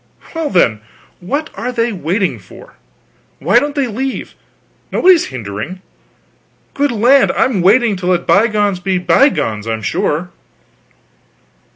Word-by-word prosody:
"Well, 325 Hz, -2 st, -2 dB
then, 115 Hz, -, +2 dB, 0.4 s
what 285 Hz, -, -3 dB
are 250 Hz, -, -4 dB
they 235 Hz, -1 st, -1 dB
waiting 180 Hz, -, -2 dB
for? 95 Hz, -, -15 dB, 0.6 s
Why 195 Hz, -, +3 dB
don't 290 Hz, +2 st, -3 dB
they 280 Hz, -2 st, +1 dB
leave? 255 Hz, +3 st, -4 dB, 0.6 s
Nobody's 360 Hz, -3 st, +4 dB
hindering. 125 Hz, -, -7 dB, 0.9 s
Good 285 Hz, 0 st, 0 dB
land, 245 Hz, +5 st, +4 dB
I'm 230 Hz, -8 st, +1 dB
willing 215 Hz, +4 st, +3 dB
to 180 Hz, -1 st, -5 dB
let 180 Hz, -1 st, +1 dB
bygones 205 Hz, -3 st, +2 dB
be 185 Hz, 0 st, -1 dB
bygones, 165 Hz, -, +1 dB
I'm 110 Hz, -1 st, -3 dB
sure." 165 Hz, -, -1 dB
200 Hz, 125 wpm, -15 LUFS, 175-255 Hz, 0.9 s, Nobody's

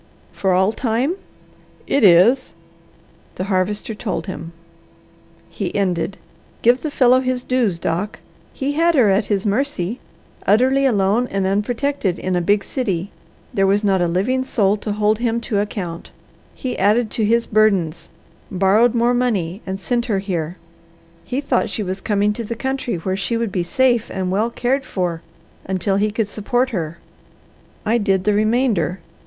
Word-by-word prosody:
"For 190 Hz, -, -1 dB
all 190 Hz, +3 st, +3 dB
time?" 240 Hz, +6 st, 0 dB, 0.7 s
"It 280 Hz, -, +1 dB
is." 205 Hz, +8 st, +5 dB, 0.8 s
The -, -, -3 dB
Harvester 200 Hz, +3 st, -1 dB
told 210 Hz, -1 st, -4 dB
him. 170 Hz, -3 st, -6 dB, 1.0 s
He -, -, -5 dB
ended, 190 Hz, -1 st, -1 dB, 0.5 s
"Give 245 Hz, +3 st, +4 dB
the 310 Hz, -, -2 dB
fellow 255 Hz, -3 st, +4 dB
his 255 Hz, -1 st, -1 dB
dues, 240 Hz, -9 st, +1 dB
Doc. 175 Hz, +5 st, -2 dB, 0.3 s
He 275 Hz, +1 st, -2 dB
had 330 Hz, +3 st, +2 dB
her 230 Hz, -8 st, +5 dB
at 200 Hz, +2 st, +2 dB
his 200 Hz, -1 st, -1 dB
mercy, 220 Hz, -2 st, -1 dB, 0.5 s
utterly 260 Hz, +6 st, +4 dB
alone 210 Hz, +1 st, +2 dB
and 195 Hz, -3 st, -1 dB
unprotected, 210 Hz, +1 st, 0 dB
in 185 Hz, -1 st, -2 dB
a 175 Hz, -, +1 dB
big 200 Hz, +3 st, +2 dB
city. 200 Hz, -8 st, -2 dB, 0.4 s
There 195 Hz, -1 st, +2 dB
was 200 Hz, +2 st, +2 dB
not 195 Hz, -3 st, +2 dB
a 175 Hz, -, +2 dB
living 215 Hz, +10 st, 0 dB
soul 205 Hz, -6 st, +1 dB
to 210 Hz, +1 st, -4 dB
hold 210 Hz, +1 st, +1 dB
him 235 Hz, -1 st, 0 dB
to 215 Hz, -4 st, -1 dB
account. 185 Hz, -5 st, -4 dB, 0.5 s
He 255 Hz, -2 st, -4 dB
added 215 Hz, +3 st, +2 dB
to 225 Hz, -, -1 dB
his 230 Hz, +2 st, +2 dB
burdens, 195 Hz, -7 st, +1 dB, 0.4 s
borrowed 200 Hz, +6 st, +3 dB
more 235 Hz, +1 st, +3 dB
money, 210 Hz, -7 st, -1 dB
and 190 Hz, 0 st, -3 dB
sent 240 Hz, +4 st, -1 dB
her 210 Hz, -4 st, +1 dB
here. 180 Hz, -3 st, -3 dB, 0.7 s
He 255 Hz, +3 st, -3 dB
thought 275 Hz, -, 0 dB
she 210 Hz, -, -3 dB
was 190 Hz, 0 st, -4 dB
coming 210 Hz, -1 st, +1 dB
to 235 Hz, -, -5 dB
the 230 Hz, +2 st, -4 dB
country 265 Hz, -1 st, -2 dB
where 185 Hz, +3 st, -2 dB
she 215 Hz, +4 st, -1 dB
would 230 Hz, -3 st, -2 dB
be 185 Hz, -, -1 dB
safe 240 Hz, +6 st, +1 dB
and 185 Hz, -1 st, -3 dB
well 215 Hz, +5 st, +1 dB
cared 260 Hz, +3 st, 0 dB
for 175 Hz, -8 st, -3 dB, 0.4 s
until 190 Hz, +1 st, 0 dB
he 210 Hz, +2 st, +2 dB
could 210 Hz, 0 st, -1 dB
support 245 Hz, +5 st, -1 dB
her. 170 Hz, -6 st, -3 dB, 0.9 s
I 230 Hz, +3 st, +2 dB
did 195 Hz, -3 st, +1 dB
the 210 Hz, -, +2 dB
remainder. 215 Hz, -4 st, +1 dB
210 Hz, 165 wpm, -20 LUFS, 190-240 Hz, 1.0 s, is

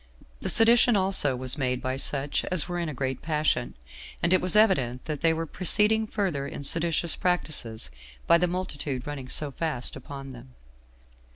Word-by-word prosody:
The -, -, -3 dB
sedition 235 Hz, 0 st, +5 dB
also 190 Hz, -8 st, +2 dB
was 130 Hz, +3 st, 0 dB
made 125 Hz, -2 st, 0 dB
by 130 Hz, 0 st, -3 dB
such 140 Hz, +1 st, -1 dB
as 180 Hz, -4 st, +2 dB
were 175 Hz, -1 st, -3 dB
in 170 Hz, -2 st, -2 dB
a -, -, -4 dB
great 130 Hz, 0 st, -3 dB
passion; 150 Hz, -6 st, -1 dB, 0.5 s
and 175 Hz, +1 st, +3 dB
it 185 Hz, -, +4 dB
was 185 Hz, +2 st, +2 dB
evident 135 Hz, -, +2 dB
that 155 Hz, -2 st, -4 dB
they 165 Hz, -, +4 dB
were 165 Hz, 0 st, -2 dB
proceeding 210 Hz, +6 st, +1 dB
further 180 Hz, -11 st, -2 dB
in 145 Hz, -, -7 dB
seditious 165 Hz, +2 st, +1 dB
practices, 140 Hz, -, -2 dB, 0.3 s
by 170 Hz, -, +5 dB
the 180 Hz, -, +2 dB
multitude 145 Hz, -7 st, -4 dB
running 140 Hz, -3 st, -7 dB
so 145 Hz, +1 st, -1 dB
fast 150 Hz, -4 st, -2 dB
upon 135 Hz, 0 st, -9 dB
them. 125 Hz, 0 st, -14 dB
155 Hz, 175 wpm, -26 LUFS, 130-180 Hz, 0.5 s, sedition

